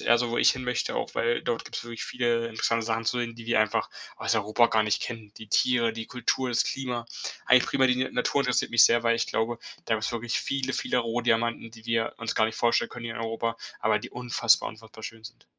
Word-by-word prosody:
eher 120 0 +4
so, 120 -1 -1
wo 120 - -2
ich - - +6
hinmöchte 125 -2 -2
auch, - - -3
weil 120 +1 +1
dort 120 -1 -2
gibt's - - -6
wirklich 115 -1 -7
viele 120 -2 0
interessante 115 0 0
Sachen 115 0 -1
zu 125 +2 0
sehen, 115 -1 -3
die 115 -1 -10
wir 115 -2 +3
einfach 110 - +1 0.3
aus - - 0
Europa 110 +2 +3
gar 110 -1 +2
nicht 105 -1 0
kennen. 110 -3 -6
Die 110 - -10
Tiere, 115 +1 +2
die 115 0 -6
Kultur, 125 +1 -1
das 120 - +2
Klima. 125 -3 -3 0.4
Eigentlich 125 0 +6
primär 130 -1 +3
die 125 0 +2
Natur 140 - +1
interessiert 125 -2 0
mich 115 - +7
sehr, 120 0 +4
weil 115 0 +4
ich - - -1
glaube, 115 +1 -1 0.3
da 115 - +1
gibt's 110 +1 -2
wirklich 120 -1 -2
viele, 135 -1 -2
viele 125 - 0
Rohdiamanten, 115 -1 0
die 115 0 -15
wir 115 -1 0
uns 115 0 -3
gar 110 - +3
nicht 110 - -5
vorstellen 120 0 +2
können 120 -1 -8
hier 115 -1 -4
in 120 - -5
Europa, 115 0 -2 0.2
aber - - +1
die - - -9
unfassbar 120 -2 +2
unfassbar 110 0 -13
schön 115 -1 -8
sind. 120 +2 -12
115 Hz, 235 wpm, -27 LUFS, 115-120 Hz, 0.4 s, mich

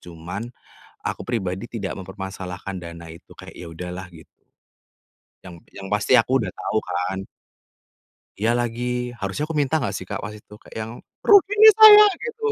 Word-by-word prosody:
cuman 90 +5 -8 0.6
aku - - -4
pribadi 95 -4 -3
tidak 105 -5 -5
mempermasalahkan 95 0 -7
dana 85 -1 -10
itu, 85 - -16
kayak - - -13
ya 85 - -9
udahlah, 90 +2 -7
git 80 -1 -15 1.2
Yang 90 -2 -10 0.2
yang 95 - -9
pasti 105 +3 0
aku - - +1
udah - - -4
tahu 110 - -2
kan. 95 +2 -3 1.1
Iya 115 +2 +2
lagi, 120 +1 -3
harusnya 100 +9 -3
aku 160 - -5
minta 145 +1 +1
gak 120 -10 -2
sih 95 -1 -7
Kak - - -5
waktu 105 0 -8
itu 105 - -17
kayak - - -15
yang, 110 +1 -6 0.3
"Rugi 405 -1 +5
nih 435 0 +10
saya!" 425 -1 +10 0.2
gitu. 460 -1 -7
100 Hz, 165 wpm, -22 LUFS, 90-125 Hz, 1.2 s, nih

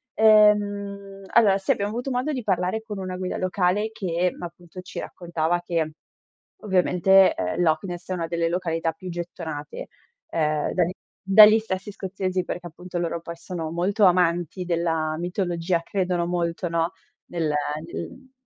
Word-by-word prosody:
Ehm, 205 -2 +3
allora, 205 -4 +5
sì, 195 - 0
abbiamo 200 0 0
avuto 245 +4 -3
modo 255 +5 -1
di 255 -4 -3
parlare 190 +2 0
con 210 -3 -6
una 185 -1 -4
guida 185 0 -3
locale 185 +3 +1
che 180 -4 -1
appunto 175 +1 -9
ci 185 - -8
raccontava 170 0 -2
che 165 -3 -2 0.7
ovviamente, 190 -1 +4
ehm, 90 - -2
Loch 160 -2 +2
Ness 175 -2 -6
è - - 0
una 165 -2 -3
delle 170 0 0
località 165 -2 -1
più 185 - -10
gettonate, 165 -4 -6 0.4
ehm, 155 -2 0
dagli 180 0 +1 0.3
dagli 215 +3 +8
stessi 205 -1 -4
scozzesi, 185 -1 -2
perché 180 0 -5
appunto 175 +1 -7
loro 170 -1 -2
poi 170 0 -8
sono 165 -2 -5
molto 195 +5 +1
amanti 175 0 +2
della 165 -2 0
mitologia, 175 -1 -1
credono 180 -3 -1
molto, 175 0 -1
no, 165 0 0 0.4
nel 165 -3 -2 0.4
nel 260 -1 -8
180 Hz, 150 wpm, -24 LUFS, 170-195 Hz, 0.7 s, dagli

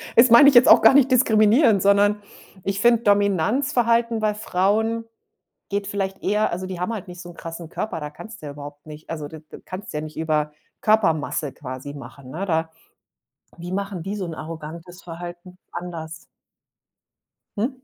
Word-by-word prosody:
das 240 +2 +7
mein 235 +5 +8
ich 280 - +7
jetzt 240 +2 +8
auch - - +8
gar - - +7
nicht 270 -1 +4
diskriminierend, 220 -2 +4
sondern 205 +1 +3 0.4
ich 195 0 -2
finde 235 +1 +4
Dominanzverhalten 230 - +2
bei 215 -1 +1
Frauen 215 +3 0 0.6
geht 200 0 -2
vielleicht 195 -1 -3
eher 210 +2 +1
also 185 +2 -4
die 185 -2 -6
haben 180 +6 -2
halt 215 -5 -6
nicht 180 -1 -10
so 180 - -10
'n - - -13
krassen 165 0 -8
Körper, 165 -1 -4
da 150 0 -6
kannst 220 +6 -12
ja 150 - -6
überhaupt 145 +1 -11
nicht 155 0 -11
also 155 -3 -5
d 160 - -10
d 155 - -14
kannst 190 +1 -8
ja 150 - -3
nicht 155 0 -9
über 155 -2 0 0.3
Körpermasse 165 - +1
quasi 130 +1 -8
machen, 135 -1 -11
ne? 170 +8 -4
Da 160 -2 0 0.9
wie 175 +1 -7
machen 195 -1 -3
die 195 +5 -4
so 200 -3 -4
'n 170 - -6
arrogantes 165 +3 -9
Verhalten 175 +1 -9
anders? 165 -2 -7 1.3
Hm? 220 +5 +1
185 Hz, 175 wpm, -22 LUFS, 160-215 Hz, 1.3 s, mein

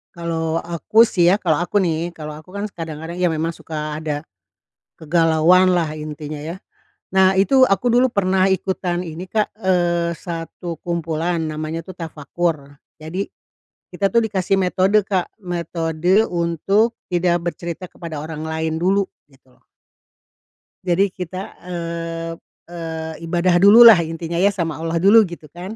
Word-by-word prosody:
Kalau 165 -1 -2
aku 175 +7 +3
sih 180 -7 +2
ya 185 - +6
kalau 170 -7 0
aku 190 +4 +1
nih, 170 0 -1
kalau 150 -1 -7
aku 170 - -18
kan 200 - -3
s - - -19
kadang-kadang 165 +1 -6
ya 180 - +3
memang 165 0 -1
suka 155 -1 -5
ada 150 -1 -3 0.8
kegalauanlah 165 +1 +3
intinya 150 0 -6
yah. 170 +4 -6 0.6
Nah 190 0 +5
itu 260 +8 +4
aku 195 +4 +1
dulu 250 +2 +5
pernah 190 -2 +2
ikutan 185 -1 -1
ini, 165 +3 -7
Kak, 215 -1 0
eee, 175 -3 +1
satu 170 -1 -6
kumpulan, 170 0 -2
namanya 155 +2 -4
tuh 185 - -9
Tafakur. 155 -2 -4 0.2
Jadi 170 +6 -4 0.7
kita 195 -1 +1
tuh 235 - +5
dikasih 195 -2 0
metode, 190 +3 +3
Kak, 190 -3 -1
metode 175 +2 0
untuk 180 +7 +1 0.2
tidak 175 0 +2 0.2
bercerita 175 +1 -7
kepada 160 -3 -7
orang 155 -1 -6
lain 160 0 -2
dulu, 195 +2 +2 0.2
gitu 135 -2 -26
loh. - - -31 1.2
Jadi 190 +2 +2
kita, 185 +1 -7
eee 165 -1 -4 0.4
eee, 160 -2 -6
ibadah 175 +1 +1
dululah 225 +1 +10
intinya 165 +1 -5
ya 200 +3 +4
sama 165 -5 -3
Allah 165 +1 -2
dulu 215 +3 +7
gitu 170 -3 -10
kan. 180 +6 -8
170 Hz, 145 wpm, -20 LUFS, 160-185 Hz, 1.2 s, dululah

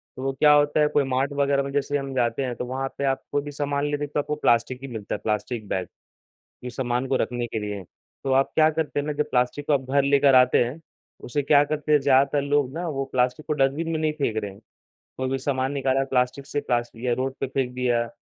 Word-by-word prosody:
तो 130 - -7
वो 135 - 0
क्या 150 +2 +5
होता 145 +1 +3
है 150 - +5
कोई 145 -1 +2
मार्ट 135 +2 0
वगैरह 140 -1 +1
में 140 - -5
जैसे 145 0 0
हम 135 -1 -5
जाते 120 +1 0
हैं 125 -2 -3
तो 125 - -4
वहाँ 135 +2 -3
पे 140 - -3
आप 135 0 0
कोई 145 - +1
भी 145 +1 -7
सामान 145 0 -1
लेते 145 0 -2
तो 145 - -2
आपको 150 +1 -2
प्लास्टिक 125 -2 +1
ही 135 - -6
मिलता 110 -4 -5
है, - - -6
प्लास्टिक 110 +1 -2
बैग 95 -1 -2 0.8
इस 125 -2 -7
सामान 125 0 -1
को 130 - +2
रखने 120 -1 -1
के 110 - -4
लिए। 105 -1 -4 0.4
तो 135 - 0
आप 135 +1 +3
क्या 155 -1 +5
करते 155 -2 -2
हैं 145 - -5
ना 150 - -1
जब 150 0 -2
प्लास्टिक 125 +3 0
को - - +1
आप 135 -2 +2
घर 140 0 +3
लेकर 140 0 +4
आते 125 0 +5
हैं, 130 +7 -6 0.4
उसे 145 +4 -1
क्या 145 +1 +5
करते 150 +1 -2
हैं 150 - +7
ज़्यादातर 140 +1 +3
लोग 145 -2 +1
ना 175 +2 -3
वो 135 -3 -2
प्लास्टिक 125 +4 0
को - - -1
डस्टबिन 145 +3 +1
में 160 - 0
नहीं 155 -1 0
फेंक 140 -7 -2
रहे 105 -2 -2
हैं। 95 - -15 0.6
कोई 130 0 -2
भी 135 - 0
सामान 130 0 -1
निकाला 135 -1 +1
प्लास्टिक 125 +2 +1
से 145 0 -2
प्लास्टि 120 -1 -2
या 120 - +3
रोड 130 +2 -2
पे 135 - -1
फेंक 130 -1 -2
दिया 120 -2 0
135 Hz, 255 wpm, -24 LUFS, 125-145 Hz, 0.8 s, हैं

